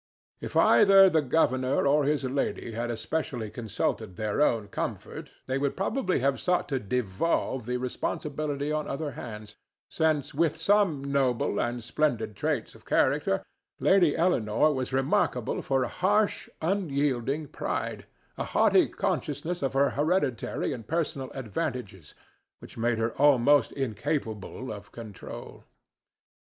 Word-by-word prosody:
If -, -, -4 dB
either 195 Hz, -2 st, +7 dB
the 160 Hz, -, +3 dB
governor 130 Hz, -2 st, +1 dB
or 145 Hz, +1 st, +3 dB
his 145 Hz, 0 st, +1 dB
lady 130 Hz, -2 st, -2 dB
had 120 Hz, +2 st, -3 dB
especially 120 Hz, -2 st, -3 dB
consulted 110 Hz, -3 st, -3 dB
their 110 Hz, +6 st, -1 dB
own 115 Hz, -8 st, +2 dB
comfort, -, -, -5 dB, 0.2 s
they 130 Hz, +1 st, -1 dB
would 140 Hz, 0 st, -1 dB
probably 195 Hz, -, 0 dB
have 135 Hz, +1 st, +1 dB
sought 180 Hz, 0 st, +1 dB
to 135 Hz, -3 st, 0 dB
devolve 125 Hz, -, -1 dB
the 125 Hz, 0 st, 0 dB
responsibility 145 Hz, +3 st, -3 dB
on 155 Hz, -1 st, -1 dB
other 145 Hz, +1 st, -3 dB
hands, 105 Hz, -4 st, -9 dB, 0.3 s
since 155 Hz, -3 st, 0 dB
with 160 Hz, +1 st, +1 dB
some 180 Hz, -5 st, +2 dB
noble 135 Hz, -6 st, 0 dB
and 120 Hz, 0 st, -2 dB
splendid 120 Hz, -5 st, -1 dB
traits -, -, -2 dB
of -, -, -17 dB
character -, -, +1 dB, 0.4 s
Lady 180 Hz, -6 st, +4 dB
Eleanore 155 Hz, -4 st, +2 dB
was 130 Hz, -2 st, -3 dB
remarkable 130 Hz, -2 st, 0 dB
for 135 Hz, -1 st, +1 dB
a -, -, -1 dB
harsh, 205 Hz, -, +1 dB
unyielding 145 Hz, -, 0 dB
pride, -, -, -4 dB, 0.3 s
a -, -, 0 dB
haughty -, -, +4 dB
consciousness 155 Hz, +5 st, -2 dB
of 135 Hz, -1 st, -1 dB
her 140 Hz, +1 st, +3 dB
hereditary 145 Hz, -5 st, 0 dB
and 115 Hz, -5 st, -8 dB
personal 150 Hz, -5 st, -2 dB
advantages, 125 Hz, -, -5 dB, 0.4 s
which -, -, -13 dB
made 115 Hz, 0 st, 0 dB
her 115 Hz, +1 st, 0 dB
almost 145 Hz, -2 st, +5 dB
incapable 130 Hz, -2 st, -3 dB
of 105 Hz, 0 st, -11 dB
control. 110 Hz, -4 st, -9 dB
135 Hz, 135 wpm, -28 LUFS, 120-155 Hz, 0.4 s, either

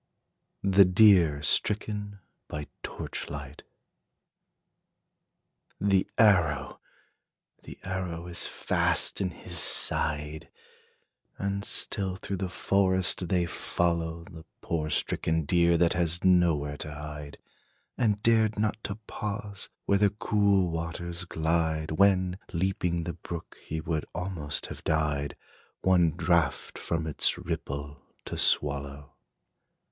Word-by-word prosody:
THE 100 Hz, 0 st, +6 dB
DEER 90 Hz, -6 st, +5 dB
STRICKEN 105 Hz, +5 st, 0 dB, 0.3 s
BY 75 Hz, 0 st, -5 dB, 0.2 s
TORCH -, -, -6 dB
LIGHT. 70 Hz, 0 st, -7 dB, 2.2 s
The 100 Hz, -2 st, +2 dB
arrow! 80 Hz, -11 st, +3 dB, 0.8 s
the -, -, -11 dB
arrow 90 Hz, -3 st, -4 dB
is 85 Hz, -1 st, -1 dB
fast -, -, 0 dB
in 95 Hz, -, 0 dB
his 90 Hz, -, -4 dB
side! 75 Hz, +1 st, 0 dB, 0.9 s
And 100 Hz, 0 st, -2 dB
still 95 Hz, -2 st, -1 dB
through 95 Hz, +1 st, -4 dB
the 95 Hz, 0 st, -3 dB
forest 95 Hz, -1 st, +1 dB
they 90 Hz, 0 st, +1 dB
follow 85 Hz, -1 st, -1 dB
The 85 Hz, -2 st, -12 dB, 0.2 s
poor 80 Hz, -2 st, -2 dB
stricken 80 Hz, +1 st, 0 dB
deer, 85 Hz, +2 st, +4 dB
that 85 Hz, 0 st, +3 dB
has 85 Hz, -1 st, 0 dB
nowhere 85 Hz, -6 st, +3 dB
to 75 Hz, -, -5 dB
hide, 75 Hz, -1 st, -8 dB, 0.6 s
And 105 Hz, -3 st, +1 dB
dared 110 Hz, -2 st, +3 dB
not 110 Hz, +1 st, -1 dB
to 100 Hz, -, -3 dB
pause 100 Hz, -1 st, -5 dB, 0.2 s
where 100 Hz, -, +3 dB
the 100 Hz, -1 st, +5 dB
cool 100 Hz, -3 st, +2 dB
waters 85 Hz, +2 st, -4 dB
glide, 80 Hz, -1 st, 0 dB
When, 95 Hz, +1 st, +3 dB
leaping 90 Hz, -1 st, 0 dB
the 85 Hz, +1 st, -4 dB
brook, 85 Hz, -1 st, -8 dB
he 80 Hz, -, -3 dB
would 80 Hz, -1 st, -2 dB
almost 85 Hz, -5 st, -3 dB
have -, -, -9 dB
died, 75 Hz, -2 st, 0 dB, 0.5 s
One 90 Hz, -3 st, +4 dB
draught 75 Hz, -, 0 dB
from 80 Hz, -1 st, -2 dB
its 80 Hz, -, +2 dB
ripple 70 Hz, +1 st, -5 dB, 0.2 s
to -, -, -5 dB
swallow. 70 Hz, 0 st, +1 dB
85 Hz, 115 wpm, -28 LUFS, 80-95 Hz, 2.2 s, THE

